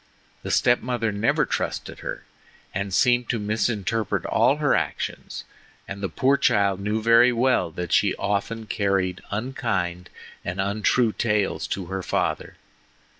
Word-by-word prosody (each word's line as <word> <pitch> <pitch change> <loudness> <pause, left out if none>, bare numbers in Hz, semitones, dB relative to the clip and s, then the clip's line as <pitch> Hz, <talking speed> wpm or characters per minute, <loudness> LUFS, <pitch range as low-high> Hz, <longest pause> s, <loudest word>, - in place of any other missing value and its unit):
The - - -6
step 120 0 +3
mother 120 -3 -1
never 105 +3 +1
trusted - - -3
her, - - -6 0.5
and 100 +1 -3
seemed 120 +3 +3
to 120 - +1
misinterpret 110 0 -1
all - - +3
her - - +1
actions, - - -3 0.4
and 100 0 -7
the 95 - -2
poor 135 - +2
child 100 -5 +2
knew 105 +2 -2
very 115 +2 +6
well 125 -5 +2
that 90 +2 -6
she 100 - +3
often 105 +3 -2
carried 95 -3 0
unkind 100 -6 -2 0.3
and 90 +2 -4
untrue 105 +4 +2
tales 105 -3 0
to 95 - -3
her 95 +2 -4
father. - - -2
105 Hz, 140 wpm, -24 LUFS, 95-115 Hz, 0.5 s, very